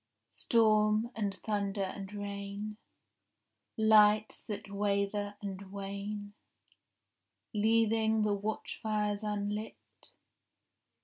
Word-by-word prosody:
— 115 - -53
Storm 215 0 +3
and 205 -3 -1
thunder 200 -2 -1
and 195 +1 -5
rain, 205 +1 -5 1.0
Lights 215 -1 +5
that 205 -1 -6
waver 205 0 0
and 195 -1 -6
wane, 200 +1 -5 1.2
Leaving 220 0 +3
the 210 -1 +2
watchfires 210 0 -2
unlit. 210 0 -2
210 Hz, 80 wpm, -32 LUFS, 200-215 Hz, 1.2 s, Lights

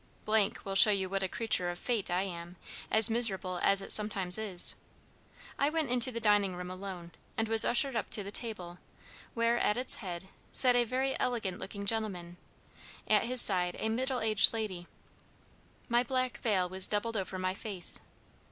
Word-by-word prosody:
will 195 - -5
show 195 +2 +6
you 195 -2 0
what 195 +1 -4
a 190 - -1
creature 200 -4 -2
of 175 - -6
fate 230 0 -3
I 180 +2 -1
am, 175 -2 -8 0.3
as 220 0 +8
miserable 195 -6 +1
as 195 0 +3
it - - +4
sometimes 200 -3 +2
is. 195 -5 +2 0.8
I 280 - +2
went 310 -5 -2
into 250 +1 +3
the 230 - -6
dining 205 -4 +1
room 180 0 -8
alone; 185 -2 -9 0.3
and 225 - -1
was 225 0 +6
ushered 255 +2 0
up 225 - -3
to 205 - +2
the 200 - -8
table, 185 -6 -5 0.6
where, 230 0 0
at 210 - 0
its 255 +1 +1
head, 185 -2 -8 0.2
sat 250 -2 +2
a 240 -1 +2
very 260 +3 -2
elegant 215 -7 -3
looking 200 +1 -7
gentleman 195 -5 -3 0.7
at 215 +1 +2
his 250 +1 +2
side 180 -3 +4
a 220 - -3
middle 255 +2 -3
aged 215 -1 +4
lady. 195 -6 -6 1.0
My 240 0 +1
black 255 0 -3
veil 195 -6 0
was 185 +1 +2
doubled 225 +2 -2
over 190 -2 -4
my 185 0 -3
face. 195 -3 -1
210 Hz, 180 wpm, -30 LUFS, 185-230 Hz, 1.0 s, as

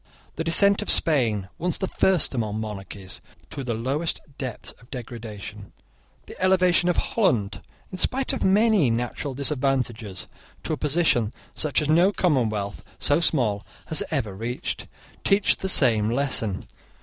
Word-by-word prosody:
The 165 - -3
descent 200 +5 +5
of 210 - -5
Spain, 115 - +3
once 175 +1 -1
the 190 - -2
first 185 -6 +2
among 110 -4 -2
monarchies, 100 -3 -7 0.3
to 140 - -5
the 120 -3 -2
lowest 135 +8 -2 0.2
depths 130 -5 -5
of 120 - -20
degradation, 110 -4 -8 0.5
the - - -11
elevation 185 -2 +3
of 175 - 0
Holland, 115 - 0 0.3
in 185 - -7
spite 265 +1 +1
of 265 - -2
many 200 - +3
natural 120 +4 -3
disadvantages, 125 - -1 0.4
to - - -2
a - - -2
position 145 -8 +1 0.2
such 150 0 0
as - - -3
no 175 +5 +4
commonwealth 110 - -1
so 145 +2 +1
small 120 -11 +1 0.3
has 160 - +1
ever 125 -10 -2
reached, 115 +5 -4 0.4
teach 195 +1 +3
the 190 - -3
same 110 - +5
lesson. 120 -6 -1
135 Hz, 145 wpm, -24 LUFS, 110-170 Hz, 0.5 s, descent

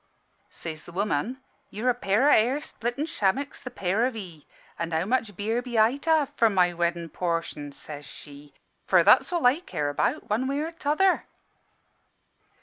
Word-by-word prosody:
"Says 160 -2 -7
the - - -11
woman, 210 - -2 0.3
'You're 240 +5 0
a - - 0
pair 235 +2 +2
o' - - +6
hair 245 +6 +4
splitting 245 -1 -3
shammicks, 275 - -1
the 255 - -6
pair 210 +1 0
of 260 - -5
'ee. 175 -8 -9 0.3
An' 170 - -2
how 160 +1 0
much 225 -3 -1
beer 220 +5 -1
be 245 -2 -4
I 220 +5 +4
to 325 - -5
have 305 -3 +3
for 230 -6 +3
my 180 -3 +3
weddin' 170 0 -1
portion?' 165 -4 -3
(says 145 +1 -9
she) 145 +1 -13 0.3
'for - - +5
that's - - +5
all 345 -6 0
I 255 +6 +5
care 150 - -3
about, 145 - -1
one 230 +5 0
way 275 +1 -1
or 320 +2 -3
t'other.' 330 +4 +1
220 Hz, 180 wpm, -26 LUFS, 170-260 Hz, 0.3 s, o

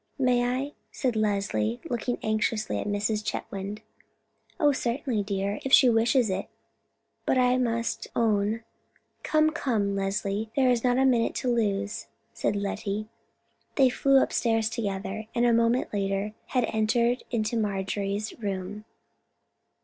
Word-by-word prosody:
"May 250 -3 +3
I?" 255 +4 -1 0.2
said 250 -4 -1
Leslie, 195 - 0
looking 240 0 -2
anxiously 215 0 0
at - - -4
Mrs. 205 +1 0
Chetwynd. 210 0 -5 0.8
"Oh, 295 -3 +5
certainly, 250 -3 -1
dear, 200 0 -2
if 270 - -3
she 255 -2 +7
wishes 230 0 +3
it; 185 - -2 0.8
but - - +1
I 250 0 +3
must 230 -2 -1
own——" 220 0 +1 0.6
"Come, 310 0 +3
come, 220 -11 0
Leslie, 200 +2 -1
there 260 -2 +4
is 235 -2 +1
not 250 0 +3
a 265 - +4
minute 240 -3 +2
to 250 -1 0
lose," 205 -2 -1 0.3
said - - -1
Lettie. 205 +1 -3 0.7
They 265 -3 +5
flew 275 +2 +4
upstairs 225 -2 +1
together, 205 0 -3
and 240 0 +3
a 240 - +4
moment 230 +1 +2
later 195 +1 -1
had 250 -3 +1
entered 235 +3 +2 0.3
Marjorie's 200 -1 -1
room. 200 0 -4
220 Hz, 135 wpm, -27 LUFS, 205-245 Hz, 0.8 s, she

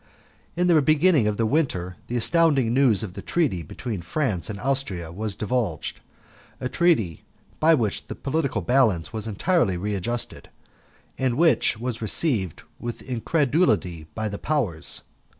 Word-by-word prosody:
In 180 - +1
the 170 -4 +5
beginning 155 -3 +4
of 105 -1 -1
the 115 - +1
winter 110 - 0
the 120 - -2
astounding 140 -3 +3
news 125 -7 +4
of 95 -5 -6
the - - -7
treaty 145 - 0
between 100 - -5
France 95 - -2
and 100 -2 -5
Austria 115 -11 -2
was 105 +3 -3
divulged 105 -6 -2 0.6
a 125 - -2
treaty 130 - +1 0.4
by 160 +1 +5
which 110 -7 -1
the - - -6
political 140 - -1
balance 115 -4 +2
was 110 -1 -3
entirely 110 - +1
readjusted, 105 +5 -3 0.7
and 130 -2 0
which 165 -8 +3
was 120 0 -4
received 110 - 0 0.2
with 120 -1 -6
incredulity 125 - +1
by 110 -1 -2
the 100 -1 -5
Powers. 105 - -1
115 Hz, 145 wpm, -24 LUFS, 100-145 Hz, 0.7 s, the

